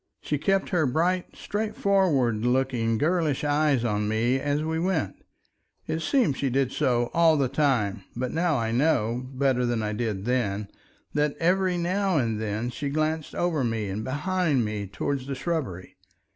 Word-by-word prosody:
She 150 - -2
kept 195 +6 +1
her 165 -6 +2
bright, 175 +7 +1
straightforward 190 - +1
looking 125 -3 +1
girlish 155 0 +1
eyes 145 -4 +2
on 105 -2 0
me 115 +4 +1
as 145 +2 -1
we 160 +1 -1
went; 165 - 0 0.7
it 160 - -2
seemed 165 - +1
she 140 - 0
did 130 0 +1
so 120 -5 +1
all 165 -2 +5
the 140 -2 +2
time, 125 -8 0
but 125 +1 -2
now 165 -2 +1
I 115 -2 -1
know, 125 -3 +1
better 130 -2 +1
than 120 -2 0
I 105 0 -2
did 105 -3 -3
then, 105 -5 -1 0.4
that 150 -1 0
every 180 +1 +2
now 185 +1 +1
and 115 -5 0
then 110 +3 -2
she 140 +3 -4
glanced 155 +1 -1
over 165 -5 0
me 115 -4 -1
and 100 +3 -3
behind 150 -1 0
me 105 -1 -3
towards 130 +7 -3
the 140 - -3
shrubbery. 130 - -4
135 Hz, 165 wpm, -26 LUFS, 115-160 Hz, 0.7 s, all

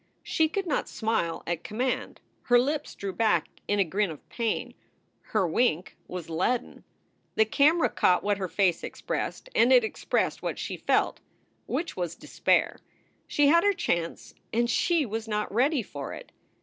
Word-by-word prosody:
She 315 -1 +1
could 390 +4 -2
not 310 - -1
smile 220 -7 -1
at 170 -1 -3
command. 250 +5 -2 0.2
Her 245 - +5
lips 290 +4 0
drew 195 -1 -5
back 210 -7 +2 0.2
in 205 - +1
a 200 - +4
grin 195 +3 0
of 155 -3 -10
pain. 230 -2 -2 0.5
Her 200 -5 +1
wink 180 -1 +1
was 180 -2 -6
leaden. 185 +9 -1 0.5
The 220 - +5
camera 300 +9 +4
caught 180 - +2
what 205 -1 0
her 190 - -2
face 180 -2 +1
expressed - - -4
and 235 +3 +4
it 250 -2 +7
expressed 220 - -1
what - - -3
she - - -4
felt, - - +1 0.5
which 335 0 -2
was 175 -2 -3
despair. - - +1 0.5
She 290 -1 +3
had 335 +2 +5
her 405 0 +4
chance 170 - -2 0.2
and 235 +1 +2
she 335 +4 +2
was 225 0 -4
not 210 -2 -2
ready 260 +3 +2
for 140 -7 -7
it. - - -10
220 Hz, 165 wpm, -27 LUFS, 185-265 Hz, 0.5 s, it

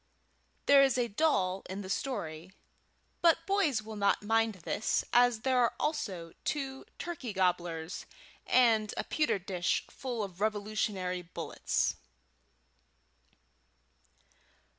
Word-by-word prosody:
There 280 -1 +7
is 270 -2 +4
a 240 -1 +1
doll 195 -8 +1
in 190 +2 -4
the - - -7
story, 185 - -3 0.7
but 330 -1 +4
boys 365 - +1
will 220 0 -8
not 200 0 +2
mind 225 0 +2
this 210 - 0
as 245 -2 +5
there 260 0 +2
are 240 -1 +2
also 185 - -2
two 270 -3 -3
turkey 285 -10 -5
gobblers 175 -2 -1 0.4
and 225 -4 +4
a - - 0
pewter 300 -8 +1
dish 180 -2 -1
full 245 -4 -4
of 190 -1 -8
Revolutionary 205 -3 -1
bullets. 175 0 -2
215 Hz, 115 wpm, -31 LUFS, 185-260 Hz, 0.7 s, There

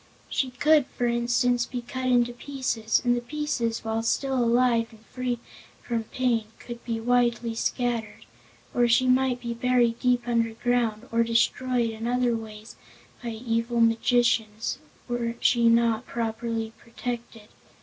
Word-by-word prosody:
She 265 - 0
could, 290 +2 +3
for 245 - -3
instance 240 0 +1
be 245 -2 -5
cut 255 +2 -4
into 245 -1 +3
pieces, 245 -4 -1
and 245 0 +4
the 240 - -2
pieces, 245 -4 -2
while 225 0 -1
still 270 +4 0
alive 240 -1 +3
and 225 -1 -18
free 255 -1 -3 0.5
from 230 -2 -2
pain, 235 -2 0
could 235 -1 -9
be 230 -1 -2
widely 240 0 +1
scattered; 235 -1 -2 0.5
or 240 -1 +3
she 245 +2 +4
might 255 0 +2
be 235 -1 -4
buried 240 -1 +2
deep 245 -1 +1
underground 230 0 0
or 230 0 +2
"destroyed" 235 +1 +1
in 225 +1 -5
other 245 -1 +1
ways 220 0 -9 0.4
by 240 - -4
evil 230 +1 -1
magicians, 230 0 +2 0.3
were 240 -1 -2
she 235 -1 +4
not 230 0 +2
properly 225 -1 -3
protected. 230 -2 -7
240 Hz, 140 wpm, -26 LUFS, 230-245 Hz, 0.5 s, and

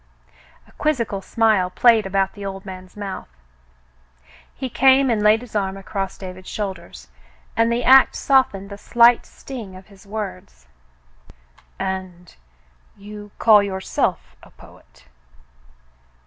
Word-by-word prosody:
A - - -21
quizzical 235 -10 -2
smile 215 -3 +1
played 225 +1 +3
about 195 0 0
the 205 - -10
old 195 0 -6
man's 185 0 -10
mouth. 200 - -6 1.2
He 260 - -6
came 265 +1 +4
and 220 -2 0
laid 210 +2 +4
his 245 -3 -13
arm 195 -1 -1
across 195 0 -5
David's 185 -1 -9
shoulders, 200 -3 -6 0.5
and 230 0 +2
the 240 +1 -1
act 265 +2 +6
softened 205 -8 +1
the 200 - -8
slight 235 +2 +4
sting 225 -9 -9
of 185 0 -13
his 200 -1 -18
words. 185 - -7 1.1
"And 185 -2 -6 0.3
— - - -35
you 210 0 -9
call 215 -2 +6
yourself 190 -1 -2
a - - -17
poet - - -19
200 Hz, 130 wpm, -21 LUFS, 190-230 Hz, 1.2 s, act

